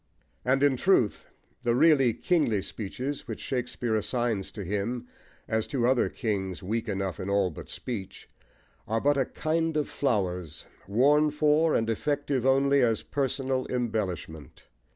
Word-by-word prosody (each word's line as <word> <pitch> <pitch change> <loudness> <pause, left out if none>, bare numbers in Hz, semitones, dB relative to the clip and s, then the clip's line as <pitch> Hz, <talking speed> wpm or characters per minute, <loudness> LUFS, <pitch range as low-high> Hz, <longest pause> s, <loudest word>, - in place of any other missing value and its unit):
And, 135 +2 +2
in 140 -2 +4
truth, 125 - +2 0.3
the 120 0 +1
really 135 -3 +5
kingly 130 - +1
speeches 130 +7 -5
which - - -5
Shakespeare 125 -2 -2
assigns 115 -2 -1
to 105 - -6
him, 105 +6 -3 0.4
as 110 0 0
to 125 -4 0
other 125 0 +3
kings 95 -7 -3
weak 110 +4 -2
enough 95 -4 -2
in 95 - -4
all 100 -2 +2
but 75 - -10
speech, 105 -7 -6 0.6
are 110 +2 0
but 145 +4 +3
a 135 -2 +2
kind 160 +2 -1
of 150 - 0
flowers, 90 - -2 0.2
worn 145 +9 +4
for, 150 +2 +3
and 115 - +1
effective 140 +2 0
only 140 +1 +4
as 115 -3 +2
personal 135 -1 -1
embellishment. 100 - -3
120 Hz, 145 wpm, -28 LUFS, 105-140 Hz, 0.6 s, really